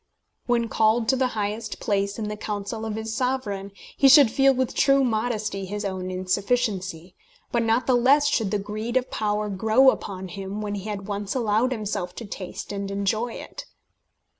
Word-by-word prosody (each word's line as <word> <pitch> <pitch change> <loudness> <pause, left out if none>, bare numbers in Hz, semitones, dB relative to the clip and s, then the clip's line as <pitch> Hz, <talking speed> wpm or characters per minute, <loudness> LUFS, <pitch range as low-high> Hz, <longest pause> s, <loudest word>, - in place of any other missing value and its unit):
When 235 -1 +2
called 225 +1 +2
to 265 - +4
the 260 0 +2
highest 215 +1 -3
place 200 0 -1
in 215 -2 -3
the 210 - -3
council 210 +1 -4
of 215 - -3
his 220 0 -4
Sovereign, 220 -6 -2 0.2
he 275 - +5
should 275 -4 +8
feel 270 +2 +5
with 260 -1 -1
true 275 0 +4
modesty 215 -4 -1
his 205 +2 -4
own 185 -1 -3
insufficiency; 185 -1 -1 0.4
but 235 - +1
not 230 +2 +1
the 260 - +3
less 265 +4 +4
should 225 -8 +1
the 210 - 0
greed 215 +4 -3
of 255 - -2
power 210 0 -1
grow 220 +7 +4
upon 190 -5 -6
him 195 +2 -6
when 210 -1 -3
he 205 +1 -5
had 200 -2 -5
once 205 +1 -4
allowed 230 +1 +1
himself 205 -6 -3
to 235 - -7
taste 195 -2 -7
and 200 -1 -4
enjoy 210 +4 -1
it. - - -9
215 Hz, 185 wpm, -25 LUFS, 200-240 Hz, 0.4 s, should